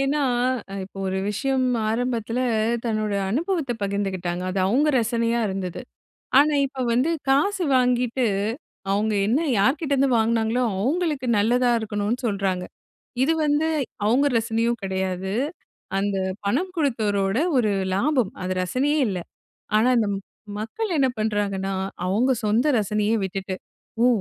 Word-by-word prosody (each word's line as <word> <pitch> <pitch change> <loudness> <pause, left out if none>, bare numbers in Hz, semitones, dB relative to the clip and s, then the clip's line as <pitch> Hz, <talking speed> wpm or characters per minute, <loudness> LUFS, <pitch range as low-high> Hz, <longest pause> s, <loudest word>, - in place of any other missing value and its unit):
ஏன்னா, 280 +2 +1 0.6
இப்ப 195 - -16
ஒரு 190 0 -1
விஷயம் 260 +4 0 0.2
ஆரம்பத்தில 235 0 -1 0.5
தன்னோட 215 -2 -1 0.2
அனுபவத்த 310 - 0
பகிர்ந்துக்கிட்டாங்க. 190 -3 -2
அது 190 - -2
அவங்க 280 +9 +3
ரசனையா 230 0 0
இருந்தது. 190 -2 -4 0.6
ஆனா 295 +1 +5
இப்ப 270 0 -12
வந்து 255 +7 +2 0.2
காசு 360 +8 +2
வாங்கிட்டு, 250 0 +2 0.7
அவுங்க 210 +2 +1
என்ன 240 +8 +2 0.2
யார்கிட்டேருந்து 275 +4 +2
வாங்கினாங்களோ, 225 +2 +1 0.2
அவங்களுக்கு 295 - 0
நல்லதா 245 +4 +3
இருக்கணும்ன்னு 215 +3 -2
சொல்றாங்க. 195 -4 -1 0.6
இது 315 +5 +3
வந்து 295 +2 +2 0.4
அவுங்க 255 +7 +3
ரசனையும் 230 +1 0
கிடையாது. 190 0 -2 0.6
அந்த 200 0 0 0.3
பணம் 335 - 0
குடுத்தவரோட 215 - 0 0.2
ஒரு 225 -4 +3 0.3
லாபம். 250 -1 +1
அது 185 0 -1
ரசனையே 270 +11 0
இல்ல. 190 -3 -2 0.6
ஆனா 225 +4 +4
இந்த 215 - +1
ம் - - -5 0.4
மக்கள் 305 - -3
என்ன 265 - +4
பண்ணுறாங்கன்னா, 205 -3 -1 0.3
அவுங்க 230 +8 +2
சொந்த 220 +7 +2
ரசனையே 210 +1 +1
விட்டுட்டு, 190 0 -4 0.5
"ஒ - - +6
230 Hz, 120 wpm, -24 LUFS, 200-265 Hz, 0.7 s, ஒ